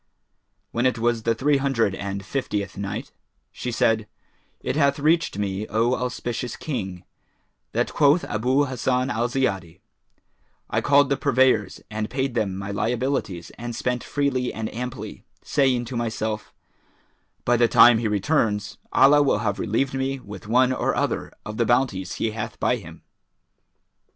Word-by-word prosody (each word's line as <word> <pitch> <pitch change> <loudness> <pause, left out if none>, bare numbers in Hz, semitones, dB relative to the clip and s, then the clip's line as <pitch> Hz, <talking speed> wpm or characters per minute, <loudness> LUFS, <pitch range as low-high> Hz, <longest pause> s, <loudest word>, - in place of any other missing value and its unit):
When 120 +2 +2
it 125 - 0
was 120 0 +1
the 115 +1 +1
Three 140 +5 +2
Hundred 135 -7 +1
and 100 0 -5
Fiftieth 105 -5 -3
Night, 105 +6 -5 0.4
She 125 - -5
said, 110 -1 +1 0.5
It - - -2
hath 140 -2 +3
reached 155 - +2
me, 100 +1 -2
O 115 +4 +1
auspicious 125 -1 -3
King, 95 - -5 0.7
that - - 0
quoth 150 +3 +4
Abu 130 +7 +1
Hassan 130 0 0
al 120 0 0
Ziyadi: 95 -10 -2 0.9
"I - - +1
called 140 -1 +4
the 140 - +2
purveyors 130 -6 +2
and 110 0 -3
paid 135 -1 -1
them 100 -5 -1
my 100 +1 -5
liabilities 115 -4 -2
and 120 0 -5
spent 125 +1 -1
freely 135 -3 0
and 110 0 -5
amply, 125 +1 -6 0.2
saying 130 -4 +2
to 120 - -6
myself, 110 -2 -3 0.9
'By 120 - +4
the 120 0 +4
time 120 0 +7
he 115 - 0
returns, 105 -1 0
Allah 140 +3 +6
will 140 - +3
have 100 -1 0
relieved 135 +6 0
me 135 0 -1
with 105 -4 -10
one 125 +3 +4
or - - 0
other - - -1
of 110 0 -6
the 115 - +2
bounties 120 -7 +1
He 110 - -1
hath 110 0 -5
by - - +2
Him.' - - -12
120 Hz, 155 wpm, -24 LUFS, 105-135 Hz, 0.9 s, time